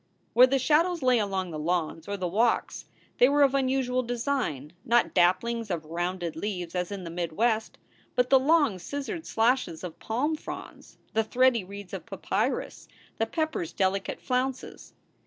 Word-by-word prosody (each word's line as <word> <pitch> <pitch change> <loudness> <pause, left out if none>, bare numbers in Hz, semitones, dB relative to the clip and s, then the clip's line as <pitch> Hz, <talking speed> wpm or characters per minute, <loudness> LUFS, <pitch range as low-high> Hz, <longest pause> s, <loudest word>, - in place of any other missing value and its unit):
Where 250 +2 +8
the 270 +1 +2
shadows 320 +5 +2
lay 250 -2 +4
along 190 -3 -2
the 155 - -5
lawns 165 0 -2
or 200 0 -3
the 185 -2 -2
walks 225 +6 0 0.3
they 250 - +7
were 290 0 +4
of 275 -1 +4
unusual 260 -2 +1
design, 235 - -2
not 240 +1 +2
dapplings 220 +6 +2
of 165 -4 -3
rounded 175 +1 -3
leaves 180 -2 -4
as 180 +1 -2
in 195 -2 -5
the 165 - -6
mid 170 -1 -3
West, 220 +3 0 0.4
but 250 +1 +1
the 265 - +8
long 290 - +3
scissored 285 - -5
slashes 225 -8 +1
of 175 -3 -7
palm 275 +8 -1
fronds, - - -9 0.2
the 220 - +2
thready 250 -1 +3
reeds 200 0 -10
of - - -6
papyrus, - - -2 0.3
the 225 - +1
pepper 315 +4 -1
s 165 - -5
delicate 195 0 -1
flounces. 255 0 -3
225 Hz, 170 wpm, -27 LUFS, 180-260 Hz, 0.4 s, Where